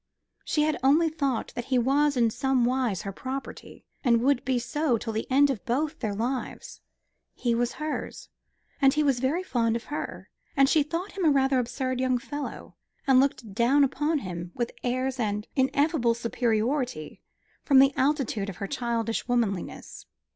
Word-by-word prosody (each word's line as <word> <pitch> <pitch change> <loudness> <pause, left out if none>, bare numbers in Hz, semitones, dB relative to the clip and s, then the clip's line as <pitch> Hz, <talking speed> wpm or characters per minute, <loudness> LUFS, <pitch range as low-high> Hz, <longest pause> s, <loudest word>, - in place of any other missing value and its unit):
She 300 - +1
had 305 0 0
only 300 +5 +4
thought 280 -6 -2
that 240 - -5
he 260 -1 +1
was 280 +3 +2
in 230 -2 +3
somewise 250 -5 0
her 200 - -4
property, 265 +7 -7 0.2
and 235 -4 +4
would 275 -1 +2
be 260 -1 0
so 255 +1 0
till 225 0 -5
the 220 - -3
end 280 +2 +4
of 240 - -5
both 290 +6 -1
their 210 -4 -2
lives. 245 +5 -4 0.5
He 240 -2 0
was 240 +1 0
hers, 310 0 -5 0.5
and 270 0 +5
he 305 - +2
was 275 -4 +2
very 285 +8 0
fond 230 -9 0
of 235 - -3
her, - - -5 0.3
and 275 0 +6
she 310 - +4
thought 335 +7 -3
him 385 - -4
a 320 - +5
rather 270 -2 +3
absurd 255 +1 -2
young 255 -1 +2
fellow, 290 +4 -6 0.3
and 265 -3 +5
looked 260 -6 0
down 245 +7 +4
upon 295 +4 +1
him 175 -7 -6
with 240 -1 -2
airs 255 +1 -1
of 210 -2 -1
ineffable 265 -2 +2
superiority 235 - -1 0.4
from 275 - +3
the 270 +1 +6
altitude 260 -8 0
of 190 - -8
her 200 - -4
childish 230 -2 -2
womanliness. 225 -7 -2
255 Hz, 170 wpm, -27 LUFS, 235-280 Hz, 0.5 s, and